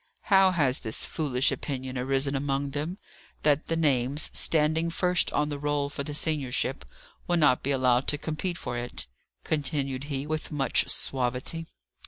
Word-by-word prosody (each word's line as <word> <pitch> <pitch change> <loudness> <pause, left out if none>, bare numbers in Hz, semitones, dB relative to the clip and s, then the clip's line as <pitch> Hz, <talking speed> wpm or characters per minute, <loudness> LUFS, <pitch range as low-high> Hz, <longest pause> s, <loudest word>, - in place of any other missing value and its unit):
"How 190 0 +7
has 145 -8 +2
this 110 -2 -1
foolish 135 -5 +1
opinion 130 -2 -4
arisen 135 +2 0
among 140 0 -1
them, 150 +6 -3 0.5
that 150 0 +2
the 165 - 0
names, 140 -2 +1
standing 160 +1 +2
first 180 0 +1
on 150 0 +1
the 145 -1 -4
roll 145 -1 0
for 140 0 -4
the 145 +1 -5
seniorship, 140 -3 -1 0.4
will 175 - +2
not 150 -6 +4
be 140 - -2
allowed 130 -1 +3
to 145 - +1
compete 165 +4 -3
for 120 -1 -4
it?" 120 -12 -3 0.4
continued 140 -3 -2
he, 140 -1 -3
with 155 +1 -3
much 140 -3 +2
suavity. 130 +5 -1
145 Hz, 160 wpm, -27 LUFS, 130-155 Hz, 0.5 s, How